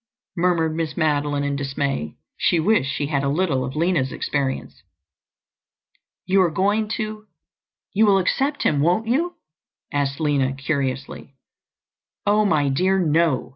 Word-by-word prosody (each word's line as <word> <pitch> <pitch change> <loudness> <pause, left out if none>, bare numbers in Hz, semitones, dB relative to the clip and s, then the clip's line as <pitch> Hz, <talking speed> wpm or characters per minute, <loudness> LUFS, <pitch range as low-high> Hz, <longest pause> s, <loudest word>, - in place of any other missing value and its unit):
murmured 170 -3 +1
Miss 160 -2 -3
Madeline 145 -2 +1
in 145 0 -1
dismay. 135 - -2 0.2
She 170 - +2
wished 185 -5 +2
she 145 +1 -2
had 140 -2 -1
a 140 - +1
little 145 -4 0
of 130 +2 -5
Lina's 155 -5 +1
experience. 135 -2 -3 1.4
"You 190 +1 +3
are 180 - +3
going 205 +6 +1
to—you 215 0 -4
will 195 -1 +5
accept 275 +10 0
him, 145 - +2
won't 175 +9 +2
you?" 315 +10 0 0.6
asked 140 0 -1
Lina 140 -4 +1
curiously. 140 -1 -3 0.9
"Oh, 210 +1 +3
my 155 -7 +2
dear, 185 +8 +2
no!" 165 -5 +1
155 Hz, 135 wpm, -22 LUFS, 140-190 Hz, 1.4 s, will